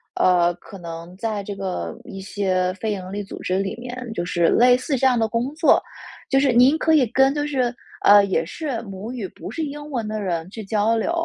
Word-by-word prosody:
呃， 175 -1 +3
可 195 +3 -13
能 170 0 -8
在 215 0 -3
这 200 0 -6
个 180 - -4
一 195 - -9
些 190 -2 -1
非 215 +3 -3
盈 185 -2 -5
利 205 0 -3
组 195 - -9
织 185 +1 0
里 195 -1 -2
面 245 0 -7
就 175 -5 -3
是 175 -1 +1
类 245 +1 +5
似 270 +2 -1
这 265 - +3
样 250 -2 +3
的 225 - +2
工 235 +5 -1
作。 315 0 +4 0.5
就 270 - +4
是 275 -1 +3
您 255 +6 +6
可 320 0 +2
以 280 -6 +4
跟 265 +4 +3
就 290 0 -1
是 255 -4 0 0.3
呃， 205 0 +8
也 175 -4 0
是 255 - -4
母 200 +2 -7
语 235 -6 -4
不 - - -9
是 320 +9 -3
英 295 0 -6
文 240 -6 -3
的 215 0 -3
人 170 -4 -2
去 220 +1 -7
交 210 +2 +1
流， 230 +8 0
215 Hz, 245 characters per minute, -22 LUFS, 190-255 Hz, 0.5 s, 呃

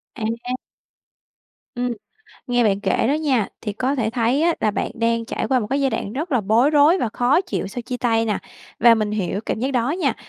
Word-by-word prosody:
À! 230 +2 -3 1.2
Ừm. 245 0 -1 0.6
Nghe 245 -1 +2
bạn 200 -1 +2
kể - - +1
đó - - +3
nha, 270 -9 +1
thì 210 - -4
có 255 +6 -1
thể 225 -4 -1
thấy 245 +5 +1
á 340 0 +3
là 215 - +2
bạn - - -2
đang 230 -1 0
trải - - -3
qua 260 -2 +3
một 210 - -3
cái 280 +1 +1
giai 270 -1 +2
đoạn 200 - -3
rất 300 +4 -4
là 250 - +3
bối 225 +8 +3
rối 305 +5 +5
và 240 - 0
khó 255 +8 +3
chịu 360 - -3
sau 235 +5 -6
chia 250 +1 -4
tay 225 -2 +1
nè. 210 -3 -1 0.4
Và 235 0 +7
mình 215 -1 -1
hiểu 200 -1 -2
cảm - - -1
giác 265 +2 0
đó 250 +1 0
nha, 310 -7 0
245 Hz, 230 wpm, -21 LUFS, 220-275 Hz, 1.2 s, Và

